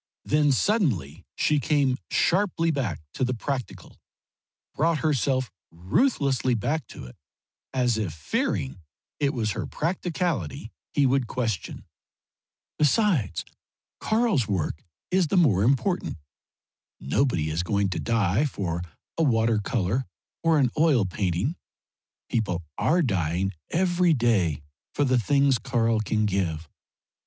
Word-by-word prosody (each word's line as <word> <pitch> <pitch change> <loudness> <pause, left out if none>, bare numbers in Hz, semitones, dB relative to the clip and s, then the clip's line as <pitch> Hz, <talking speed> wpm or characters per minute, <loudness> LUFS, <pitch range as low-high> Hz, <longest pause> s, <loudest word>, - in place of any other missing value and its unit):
Then 150 -1 +3
suddenly 115 - 0
she 150 -1 +2
came 140 -3 +1
sharply 175 -3 +2
back 115 - -2
to - - -2
the 125 0 0
practical, 130 +1 -5 0.7
brought 160 +2 +2
herself 135 -3 +1 0.2
ruthlessly 130 - +1
back 145 +6 -2
to - - -10
it, 60 - -12 0.6
as 125 -4 +1
if 100 -6 -2
fearing 75 -1 -2 0.4
it 140 -2 +2
was 110 -5 -1
her - - -4
practicality 165 - -2 0.2
he 145 - +2
would 130 -2 +2
question. 110 -8 -3 0.9
"Besides, 150 - +2 0.5
Karl's 215 - +1
work 90 -6 -2 0.3
is 185 -2 +3
the 190 - +1
more 125 - +4
important. 140 - +1 0.8
Nobody 80 - 0
is 80 +3 0
going 100 +2 0
to 95 - -3
die 115 +2 +1
for 90 - -3 0.4
a - - +4
water 115 -5 +2
colour 115 +2 -1 0.3
or 165 -1 +3
an 130 -5 +3
oil 145 -10 +4
painting; 95 - -1 0.7
people 90 -7 -1
are 175 +2 +2
dying 95 - 0 0.2
every 175 -1 +2
day 95 - +1 0.3
for 145 - +2
the 130 -2 +3
things 140 0 +3
Karl 115 -1 +1
can 110 0 0
give. 85 -6 -1
125 Hz, 125 wpm, -26 LUFS, 95-150 Hz, 0.9 s, more